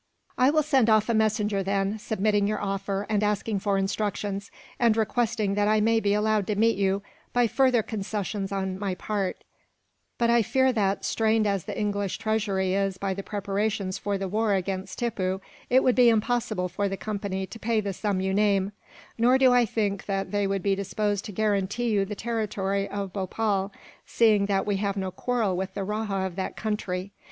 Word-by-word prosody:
"I 255 Hz, +1 st, +4 dB
will 310 Hz, +1 st, +3 dB
send 270 Hz, -6 st, +3 dB
off 215 Hz, +1 st, +4 dB
a -, -, +3 dB
messenger, 215 Hz, -2 st, +1 dB
then, 195 Hz, +2 st, -1 dB
submitting 205 Hz, -1 st, +1 dB
your 215 Hz, -, -1 dB
offer 195 Hz, 0 st, -2 dB
and 210 Hz, -1 st, +1 dB
asking 210 Hz, 0 st, 0 dB
for 200 Hz, 0 st, 0 dB
instructions, 200 Hz, 0 st, -2 dB, 0.3 s
and 230 Hz, -2 st, +3 dB
requesting 225 Hz, -2 st, 0 dB
that 205 Hz, 0 st, +1 dB
I 215 Hz, 0 st, +3 dB
may 225 Hz, +1 st, +3 dB
be 205 Hz, -2 st, +1 dB
allowed 210 Hz, -1 st, +1 dB
to 210 Hz, -, 0 dB
meet 225 Hz, +2 st, +3 dB
you, 195 Hz, 0 st, 0 dB, 0.3 s
by 245 Hz, 0 st, +4 dB
further 250 Hz, -1 st, +3 dB
concessions 205 Hz, -1 st, -3 dB
on 190 Hz, -1 st, -2 dB
my 195 Hz, -2 st, -2 dB
part; 195 Hz, 0 st, -3 dB, 0.7 s
but 235 Hz, -, +2 dB
I 235 Hz, 0 st, +4 dB
fear 260 Hz, +4 st, +2 dB
that, 200 Hz, -3 st, 0 dB
strained 220 Hz, -1 st, +2 dB
as 200 Hz, -4 st, 0 dB
the 205 Hz, -, -5 dB
English 205 Hz, -2 st, -1 dB
treasury 200 Hz, -4 st, 0 dB
is 195 Hz, -1 st, 0 dB
by 195 Hz, 0 st, -2 dB
the 195 Hz, -, -5 dB
preparations 200 Hz, -1 st, -2 dB
for 200 Hz, 0 st, -1 dB
the 195 Hz, 0 st, -3 dB
war 210 Hz, +1 st, +1 dB
against 190 Hz, 0 st, -3 dB
Tippoo, 190 Hz, -6 st, -1 dB, 0.3 s
it 260 Hz, +2 st, +5 dB
would 255 Hz, -, +4 dB
be 245 Hz, -2 st, +6 dB
impossible 220 Hz, -4 st, 0 dB
for 200 Hz, +3 st, -2 dB
the 195 Hz, -, -3 dB
Company 200 Hz, -2 st, -3 dB
to 225 Hz, -, -11 dB
pay 225 Hz, 0 st, +1 dB
the 200 Hz, -2 st, -2 dB
sum 200 Hz, 0 st, -1 dB
you 190 Hz, 0 st, 0 dB
name; 200 Hz, -1 st, +2 dB, 0.5 s
nor 245 Hz, +3 st, +5 dB
do 260 Hz, -2 st, +5 dB
I 245 Hz, -1 st, +5 dB
think 200 Hz, -2 st, -2 dB
that 195 Hz, -1 st, -2 dB
they 205 Hz, -1 st, +1 dB
would 195 Hz, -1 st, -1 dB
be 200 Hz, -, +2 dB
disposed 200 Hz, +1 st, -1 dB
to -, -, -6 dB
guarantee 210 Hz, +3 st, 0 dB
you 200 Hz, -2 st, +2 dB
the 210 Hz, +2 st, -5 dB
territory 200 Hz, -3 st, -2 dB
of 200 Hz, -2 st, -4 dB
Bhopal, 195 Hz, 0 st, -1 dB, 0.4 s
seeing 215 Hz, -3 st, +3 dB
that 195 Hz, -1 st, +1 dB
we 205 Hz, -2 st, 0 dB
have 200 Hz, 0 st, -1 dB
no 190 Hz, -1 st, -2 dB
quarrel 225 Hz, -3 st, -1 dB
with 190 Hz, +1 st, -4 dB
the 200 Hz, -, -2 dB
rajah 205 Hz, -1 st, -2 dB
of 185 Hz, -1 st, -6 dB
that 190 Hz, -, -3 dB
country. 200 Hz, -3 st, -3 dB
205 Hz, 195 wpm, -26 LUFS, 195-220 Hz, 0.7 s, be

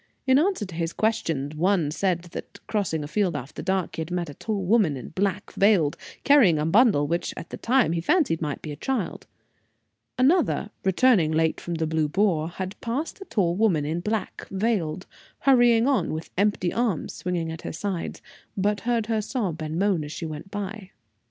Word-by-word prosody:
In 260 Hz, +1 st, +5 dB
answer 360 Hz, -, +1 dB
to 185 Hz, -, -10 dB
his 165 Hz, 0 st, -2 dB
questions, 160 Hz, -10 st, -1 dB
one 170 Hz, -2 st, +2 dB
said 175 Hz, 0 st, 0 dB
that, -, -, -8 dB
crossing 185 Hz, -8 st, -1 dB
a -, -, -5 dB
field 180 Hz, +1 st, 0 dB
after 130 Hz, +2 st, -6 dB
dark, 190 Hz, -1 st, -1 dB
he -, -, -4 dB
had 160 Hz, -, -5 dB
met 175 Hz, -3 st, -2 dB
a -, -, -10 dB
tall 205 Hz, +3 st, -3 dB
woman, 190 Hz, -, +3 dB
in 125 Hz, -, -8 dB
black, 190 Hz, +1 st, -2 dB
veiled, 195 Hz, -8 st, +3 dB, 0.3 s
carrying 250 Hz, -, +6 dB
a 150 Hz, -, 0 dB
bundle 195 Hz, -, +4 dB
which, 170 Hz, +4 st, -2 dB
at 165 Hz, -, -8 dB
the -, -, -5 dB
time, 250 Hz, -6 st, +2 dB
he 165 Hz, 0 st, -1 dB
fancied 175 Hz, -, +2 dB
might 150 Hz, -3 st, -3 dB
be 155 Hz, -, -5 dB
a -, -, -5 dB
child. 220 Hz, -, -3 dB, 0.9 s
Another, 265 Hz, -, +2 dB
returning 190 Hz, -4 st, +4 dB
late 160 Hz, 0 st, +1 dB
from 175 Hz, -, -4 dB
the 160 Hz, 0 st, -1 dB
Blue 155 Hz, -1 st, 0 dB
Boar, 170 Hz, -3 st, +1 dB
had 185 Hz, +2 st, -6 dB
passed 275 Hz, -, -3 dB
a -, -, -7 dB
tall 175 Hz, -, 0 dB
woman, 185 Hz, -8 st, +2 dB
in 160 Hz, +3 st, -1 dB
black, 210 Hz, +3 st, -3 dB
veiled, 190 Hz, -5 st, -1 dB, 0.4 s
hurrying 245 Hz, -3 st, +5 dB
on, 235 Hz, -, +1 dB
with 160 Hz, +1 st, -6 dB
empty 200 Hz, -2 st, +1 dB
arms 230 Hz, -8 st, -1 dB
swinging 175 Hz, -2 st, -3 dB
at 160 Hz, -, -7 dB
her -, -, -5 dB
side, 185 Hz, 0 st, -4 dB, 0.4 s
but 205 Hz, +2 st, +1 dB
heard 230 Hz, 0 st, 0 dB
her 220 Hz, -1 st, 0 dB
sob 205 Hz, -, -3 dB
and 155 Hz, +1 st, -3 dB
moan 190 Hz, -4 st, +1 dB
as 150 Hz, -, -7 dB
she 165 Hz, -, -5 dB
went 155 Hz, +3 st, -7 dB
by. 205 Hz, -1 st, -6 dB
185 Hz, 195 wpm, -25 LUFS, 160-220 Hz, 0.9 s, carrying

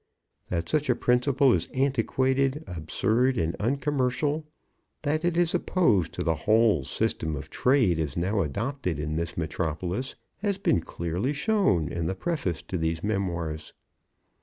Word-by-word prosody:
That 85 Hz, -2 st, -2 dB
such 150 Hz, -2 st, 0 dB
a 125 Hz, -, +4 dB
principle 125 Hz, +2 st, +3 dB
is 85 Hz, -, 0 dB
antiquated, 135 Hz, +2 st, +1 dB
absurd, 110 Hz, +10 st, 0 dB
and 80 Hz, 0 st, 0 dB
uncommercial; 140 Hz, +4 st, 0 dB, 0.6 s
that 155 Hz, +2 st, 0 dB
it 175 Hz, -1 st, +1 dB
is 175 Hz, -1 st, +3 dB
opposed 120 Hz, -, +2 dB
to -, -, -3 dB
the 80 Hz, -, +2 dB, 0.2 s
whole 110 Hz, -8 st, +4 dB
system 80 Hz, +4 st, -1 dB
of 70 Hz, -, -8 dB
trade 125 Hz, -, +3 dB
as 75 Hz, -2 st, -2 dB
now 100 Hz, +4 st, +1 dB
adopted 100 Hz, -, -2 dB
in 75 Hz, +1 st, -2 dB
this 85 Hz, +1 st, -3 dB
metropolis, 85 Hz, -, -2 dB, 0.2 s
has 200 Hz, -2 st, -1 dB
been 145 Hz, -, +2 dB
clearly 85 Hz, -, -2 dB
shown 150 Hz, -, +2 dB
in 85 Hz, -1 st, -2 dB
the 95 Hz, -, -1 dB
preface 120 Hz, -, -2 dB
to 90 Hz, -, -4 dB
these 80 Hz, 0 st, -1 dB
memoirs. 85 Hz, -7 st, -2 dB
110 Hz, 145 wpm, -27 LUFS, 85-140 Hz, 0.6 s, a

